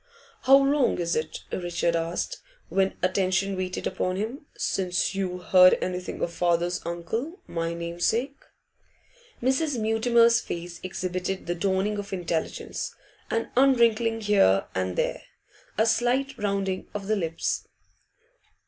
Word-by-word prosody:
'How 270 +1 +8
long 275 -1 +2
is 170 -1 -1
it,' 155 0 -3
Richard 175 -1 -1
asked, 170 - -2 0.3
when 195 0 +1
attention 190 +1 +1
waited 185 0 -3
upon 185 0 -1
him, 230 +9 -4
'since 180 -1 0
you 190 -2 -2
heard 185 0 +6
anything 180 0 -3
of 170 - -2
father's 175 0 +1
uncle, 225 - -4
my 165 0 -3
namesake?' 175 +11 -1 1.0
Mrs. 265 +1 +1
Mutimer's 230 +1 +4
face 175 -3 -6
exhibited 185 +1 -3
the 175 - -1
dawning 195 +3 0
of 200 -1 -6
intelligence, 170 -3 -3 0.3
an 230 0 -1
unwrinkling 235 -4 +3
here 195 - +4
and 95 -1 -1
there, - - -1 0.6
a 220 - +4
slight 245 +4 +1
rounding 195 -4 -2
of 205 -1 -4
the 215 +2 +1
lips. 165 -4 -2
190 Hz, 125 wpm, -26 LUFS, 175-230 Hz, 1.0 s, How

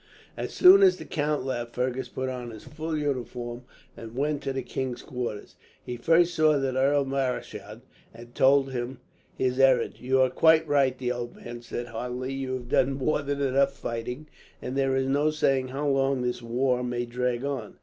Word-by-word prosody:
As - - -4
soon 380 +2 +8
as 380 -2 +6
the - - -9
count 150 -3 -1
left, 120 -3 -4
Fergus 130 +1 -2
put 130 - -4
on 125 -2 -5
his 110 -2 -10
full 155 +1 -4
uniform 125 -4 -4 0.3
and 115 0 -10
went 145 +2 -1
to 135 - -3
the 135 -1 -3
king's 130 -1 -4
quarters. 120 -5 -6 0.3
He 125 - -5
first 165 +7 +3
saw 155 -1 +4
the 135 -2 -1
Earl 140 +2 +3
Marischal, 125 -5 -3 0.3
and 120 +1 -13
told 135 0 +4
him 125 +1 -4 0.4
his 130 0 -1
errand. 130 -3 +3
"You 130 +1 +1
are 130 -1 +3
quite 160 +3 +4
right," 135 -3 +2
the 125 -1 -2
old 120 -1 -5
man 120 0 -9
said 120 0 -5
heartily. 125 +3 -4
"You 135 -1 -3
have 120 -2 -7
done 135 +1 +3
more 140 +3 0
than 140 0 -3
enough 140 0 +2
fighting, 125 +5 -5 0.3
and 125 - -5
there 135 -1 +1
is 135 0 +1
no 145 +3 +2
saying 135 -4 +1
how 140 +3 -3
long 135 -2 +1
this 125 0 -2
war 125 +2 0
may 120 0 -2
drag 125 +1 -2
on. 135 -7 -4
130 Hz, 190 wpm, -27 LUFS, 125-140 Hz, 0.4 s, soon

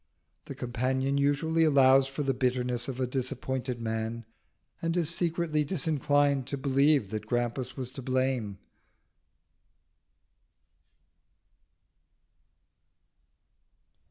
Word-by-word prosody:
The - - -7
companion 130 +3 -1
usually 160 +4 +2
allows 135 -3 +5
for 135 +2 -4
the 135 -1 +1
bitterness 125 -1 -1
of 130 -2 -5
a 130 - +1
disappointed 130 -1 -3
man, 110 0 -3 0.6
and 165 +1 -1
is 165 -1 +1
secretly 165 -3 0
disinclined 145 -4 +1
to 140 - -3
believe 140 -4 +2
that 105 -1 -5
Grampus 120 +2 -2
was 130 -2 -5
to 135 - -8
blame. 130 -5 -1
130 Hz, 95 wpm, -29 LUFS, 125-145 Hz, 0.6 s, allows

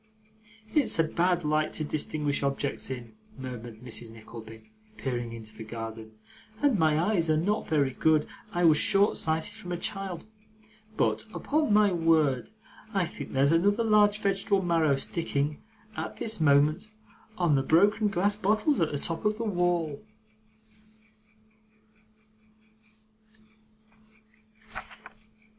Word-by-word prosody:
'It's 290 - +4
a 165 - +4
bad 175 +2 0
light 155 0 0
to 155 - -3
distinguish 150 -1 -2
objects 140 0 -2
in,' 125 -3 -7 0.2
murmured 120 -3 -8
Mrs. 120 -1 -4
Nickleby, 110 - -12 0.3
peering 120 -3 -3
into 110 -2 -7
the 110 - -8
garden, 110 0 -7 0.5
'and 270 -7 +2
my 155 -1 +3
eyes 170 -2 +1
are 155 - +3
not 205 +7 -1
very 145 -4 +2
good 155 +3 +2 0.3
I 175 - -1
was 160 -3 +6
short 200 +1 +3
sighted 160 +5 0
from 210 -5 -9
a 175 - -1
child 190 -1 -4 0.7
but, - - +1
upon 300 -4 0
my 210 -1 +5
word, 160 -7 +2 0.5
I 190 -2 +2
think 170 - -8
there's 140 +2 +3
another 205 +7 +3
large 210 -1 +4
vegetable 195 -1 0
marrow 165 -5 +2
sticking, 145 0 -2 0.3
at - - -5
this 220 -6 0
moment, 150 +6 +3 0.5
on 175 -4 +2
the 135 - +3
broken 200 +9 +3
glass 200 +1 +1
bottles 215 - +1
at 160 - +1
the 145 - -2
top 165 +3 -3
of 210 0 +1
the 230 - -3
wall! 175 -6 -1
160 Hz, 130 wpm, -28 LUFS, 140-195 Hz, 0.7 s, was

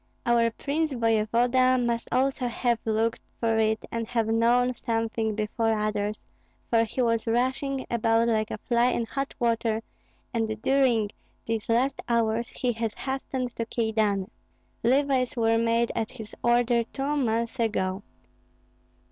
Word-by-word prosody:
Our 235 -1 +3
prince 295 +6 -2
voevoda 240 +3 +3
must 235 -1 -1
also 260 0 +1
have 240 -1 0
looked 225 +1 0 0.2
for 225 -1 +1
it 220 0 +1
and 230 -1 -3
have 230 -2 0
known 235 +3 +3
something 225 -2 -2
before 220 +1 0
others, 210 0 -2 0.5
for 230 -1 +4
he 240 +3 -1
was 230 -1 0
rushing 260 +3 0
about 230 0 +2
like 220 -2 +1
a - - -4
fly 235 +2 +2
in 240 -2 0
hot 275 +4 -4
water, 230 -1 0 0.5
and 220 -2 -1
during 250 -6 +3 0.3
these 225 -1 -3
last 255 +4 +1
hours 230 0 +1
he 250 - -1
has 225 -1 -3
hastened 265 -2 -4
to 230 - -2
Kyedani. 220 -3 0 0.5
Levies 260 0 +2
were 225 0 +3
made 230 0 +2
at 220 - -2
his 215 -1 -10
order 240 0 +3
two 275 +5 -3
months 235 -2 -1
ago. 195 -4 0
230 Hz, 140 wpm, -26 LUFS, 225-245 Hz, 0.5 s, for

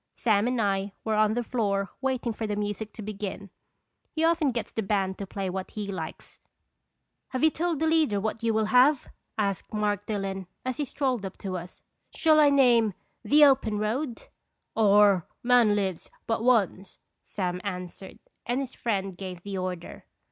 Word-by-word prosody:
Sam 215 -1 +2
and 250 -1 0
I 200 -1 0
were 220 - -1
on 215 0 +3
the 245 - 0
floor 200 -5 -1
waiting 255 -3 -1
for 220 0 -4
the 210 - -2
music 205 +1 -3
to 220 - -8
begin. 200 -2 -6 0.6
He 315 - -2
often 330 -3 +3
gets 235 -2 -4
the 225 - -2
band 195 -2 -1
to 200 - -5
play 195 0 -4
what 185 +1 -4
he 205 -2 -5
likes. 165 -4 -7 0.5
" - - -53
Have 255 - -1
you 315 - +6
told 335 +1 -1
the 320 - +1
leader 315 -10 +2
what 220 +2 -3
you 230 -1 +1
will 220 0 +1
have?" 260 +3 +5 0.3
asked 200 -3 -2
Mark 205 -1 -1
Dillon, 195 -3 -3 0.2
as 255 -1 -2
he 295 - -1
strolled 260 -4 -1
up 190 -1 -6
to 190 -2 -5
us. 180 0 -8
" - - -26
Shall 310 -2 +4
I 295 -1 +7
name 240 -7 +4
' - - -47
The 295 0 +8
Open 260 -6 +3
Road* 230 +5 -2 0.3
?" - - -53
/'Or 205 -4 +5 0.2
'Man 240 -4 +5
lives 190 -4 -2 0.2
but 225 0 -1
once,'" 205 -6 +1 0.2
Sam 180 -2 -3
an 180 -3 -3
swered, 185 +2 -11 0.3
and 245 +2 0
his 265 -2 -4
friend 195 -5 -2
gave 180 -1 -7
the 195 -2 -4
order. 180 -2 -5
210 Hz, 190 wpm, -27 LUFS, 195-245 Hz, 0.6 s, The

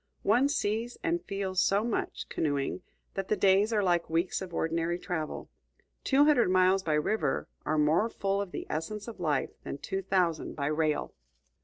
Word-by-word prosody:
One 245 +7 +4
sees 230 -3 -1
and 340 +1 0
feels 190 -2 -1
so 200 +2 +2
much, 235 -1 -2
canoeing, 145 +3 -1 0.3
that 195 -1 -3
the - - +2
days 200 +3 +4
are 210 -2 +2
like 175 -3 +1
weeks 170 +4 0
of 185 -2 -6
ordinary 165 +1 -1
travel. 175 -4 -4 0.5
Two 280 +2 +4
hundred 290 -10 +4
miles 185 +1 +4
by 160 -4 -1
river 180 +9 0 0.2
are 155 +1 +1
more 155 +9 +3
full 195 -2 -1
of 200 -3 -5
the - - -5
essence 205 +8 -4
of 230 -4 -8
life 150 -5 0
than - - -5
two 190 +6 -3
thousand 180 -4 0
by 140 - -2
rail. 155 0 0
185 Hz, 175 wpm, -29 LUFS, 160-210 Hz, 0.5 s, One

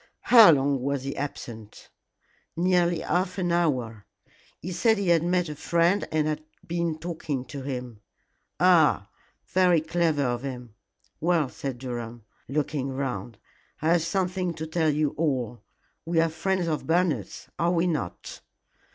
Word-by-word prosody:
"How 225 -5 +11
long 140 -3 +3
was 140 0 -1
he 135 +1 -4
absent?" 115 -6 -7 0.7
"Nearly 175 -1 +2
half 180 +1 -1
an 175 -2 0
hour. 125 - 0 0.5
He 180 - -6
said 220 +5 +2
he 200 -3 -1
had 170 -2 +5
met 175 +1 +1
a 150 - -5
friend 170 +6 +1
and 155 -1 +1
had 155 0 -2 0.2
been 170 -2 -2
talking 155 -5 -4
to 135 +2 -7
him." 125 -5 -6 0.6
"Ah! 160 - +4 0.4
Very 180 -2 +4
clever 160 -2 0
of 120 -2 -1
him. 125 -4 -7 0.5
Well," 165 -4 +1
said 135 -2 -5
Durham, 120 -2 -6 0.2
looking 140 -1 -2
round, 130 -4 -4 0.4
"I 155 - 0
have 170 0 +4
something 180 0 -1
to 160 - -5
tell 160 0 +1
you 150 0 +1
all. 130 -8 -1 0.4
We 165 0 0
are 165 0 +3
friends 180 +2 -1
of 155 -2 -2
Bernard's, 160 - 0
are 170 +1 +2
we 175 0 +2
not?" 150 - -4
155 Hz, 150 wpm, -26 LUFS, 135-175 Hz, 0.7 s, How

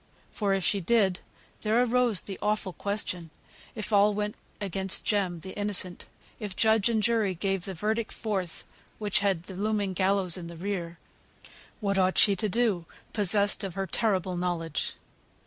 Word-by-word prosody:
For 200 -3 +1
if 190 - -1
she 200 +3 +2
did, 195 -2 +2 0.4
there 220 +2 +2
arose 245 -4 +2
the 195 - -7
awful 210 -3 0
question, 185 -5 -2 0.5
if 215 -1 -4
all 205 +1 +5
went 210 0 -1 0.3
against 195 -1 -1
Jem 185 -5 0
the 190 - -8
innocent, 200 -3 -1 0.3
if 205 -3 -5
judge 220 0 +3
and 220 -2 +1
jury 220 -4 +2
gave 195 +1 -1
the 190 - -5
verdict 215 +5 -1
forth 195 -6 -3 0.3
which 210 -2 +1
had 195 -4 +1
the 190 - -9
looming 205 -1 0
gallows 190 -1 +1
in 170 -2 -7
the 170 0 -9
rear, 175 -2 -3 0.8
what 200 -2 +1
ought 185 0 +2
she 200 - +6
to 215 +3 -1
do, 205 -6 +1 0.3
possessed 205 0 +3
of 190 -3 -4
her 195 0 -1
terrible 190 -4 +1
knowledge? 175 -3 -2
200 Hz, 165 wpm, -28 LUFS, 185-210 Hz, 0.8 s, she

